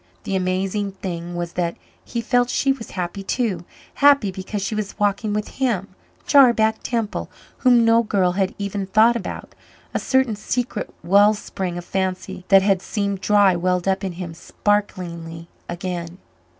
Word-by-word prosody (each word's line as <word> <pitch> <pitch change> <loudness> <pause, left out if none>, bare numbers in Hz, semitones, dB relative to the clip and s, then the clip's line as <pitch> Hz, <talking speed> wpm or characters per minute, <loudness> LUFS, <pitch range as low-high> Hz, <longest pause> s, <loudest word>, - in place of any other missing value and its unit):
The 195 - -2
amazing 190 +2 -1
thing 175 -2 -5
was 175 -1 -4
that 170 -1 -2 0.3
he 235 - -4
felt 245 +1 +2
she 275 +2 +2
was 265 -4 -5
happy 180 +2 -3
too 195 -4 -1 0.3
happy 280 -8 +4
because 190 +2 -5
she 195 - -2
was 210 -2 -4
walking 205 +1 0
with 210 0 -1
him, 225 -8 -1 0.4
"Jarback" 235 -6 +5
Temple, 230 -3 -2 0.3
whom 245 -3 +5
no 230 0 +5
girl 195 -5 +1
had 190 +1 -1
even 200 -1 -3
thought 220 +4 +5
about. 235 - -6 0.4
A - - 0
certain 265 -4 +1
secret 240 +4 -3
well 200 +4 +5
spring 185 -3 -5
of 175 - -7
fancy 185 -1 -3
that 195 -1 +6
had 195 -2 +2
seemed 200 -2 -2
dry 205 -3 +4
welled 180 +1 0
up 190 0 +1
in 190 -2 -3
him 170 -1 -6
sparklingly 170 -4 -3 0.2
again. 175 -1 -5
195 Hz, 160 wpm, -22 LUFS, 180-220 Hz, 0.4 s, that